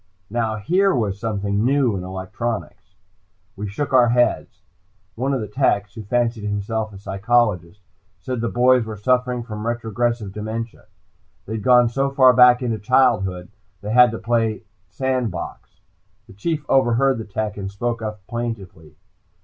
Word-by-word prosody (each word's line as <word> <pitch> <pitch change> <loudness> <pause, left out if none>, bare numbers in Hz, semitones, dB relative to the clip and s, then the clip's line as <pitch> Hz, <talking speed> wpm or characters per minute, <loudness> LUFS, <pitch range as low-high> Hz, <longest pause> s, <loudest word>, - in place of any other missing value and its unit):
Now 110 -1 -1
here 180 - +2
was 100 -5 -1
something 100 -2 -1
new 130 -3 +2
in 90 - -4
electronics! 95 +1 -5 0.6
We 105 +1 -5
shook 135 +7 -4
our 125 -2 +6
heads. 120 +1 0 0.5
One 130 +5 -2
of 135 -3 -1
the 105 - -4
techs, 105 -3 0
who 110 - -8
fancied 120 +1 -1
himself 105 +2 -2
a 100 - -11
psychologist, 100 -2 0 0.4
said 125 -3 -4
the 115 - -1
boys 125 0 +4
were 110 -1 -7
suffering 125 +2 0
from 110 -1 -6
retrogressive 115 -2 -2
dementia. 110 +2 -6 0.6
They 110 - -6
had 110 - -3
gone 125 -1 +5
so 135 +4 0
far 130 -2 +5
back 125 0 +6
into 115 -3 -1
childhood, 100 -6 +1 0.3
they 105 +1 -5
had 125 +1 +7
to 115 - -5
play 115 -2 -1 0.3
sand 130 -3 -1
box. 90 +1 -8 0.5
The - - -15
Chief 150 - -3
overheard 130 0 +3
the - - -4
tech, 105 0 -3
and 95 -1 -5
spoke 115 +4 -3
up 105 -3 -6
plaintively. 110 -9 -6
115 Hz, 155 wpm, -21 LUFS, 105-125 Hz, 0.6 s, had